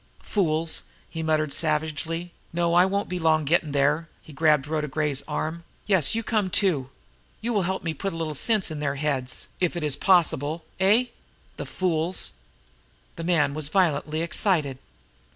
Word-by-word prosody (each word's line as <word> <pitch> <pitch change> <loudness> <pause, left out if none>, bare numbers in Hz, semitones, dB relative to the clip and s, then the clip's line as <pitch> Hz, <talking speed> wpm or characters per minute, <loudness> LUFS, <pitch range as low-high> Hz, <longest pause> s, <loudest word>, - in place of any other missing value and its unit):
"Fools!" 165 -5 0 0.3
he 160 - -4
muttered 155 -2 0
savagely. 160 +2 -1 0.2
"No, 170 0 +1
I 175 +1 +6
won't 200 +1 -1
be 180 0 -3
long 160 -2 +2
gettin' 155 0 +2
there!" 145 +4 +1
He 155 - -13
grabbed 150 -1 +3
Rhoda 150 0 -2
Gray's 150 -1 -1
arm. 160 +2 -3 0.2
"Yes, 190 -8 +3
and - - +2
you 230 - -1
come, 210 -4 0
too! 165 -10 +1 0.5
You 235 +2 -2
will 205 - +2
help 190 - -2
me 165 -1 -2
put 195 +4 -3
a - - -7
little 160 -2 -3
sense 200 - +1
into 150 -1 -5
their 140 -1 -1
heads, 135 -3 -2
if 180 -1 0
it 170 - -3
is 150 -3 +1
possible 160 -2 +2
eh? 210 +6 +4 0.5
The - - -5
fools!" 175 -1 0 0.8
The 165 - -6
man 155 -5 +2
was 150 -1 -1
violently 160 -3 +1
excited. 160 -7 +1
160 Hz, 170 wpm, -25 LUFS, 150-180 Hz, 0.8 s, I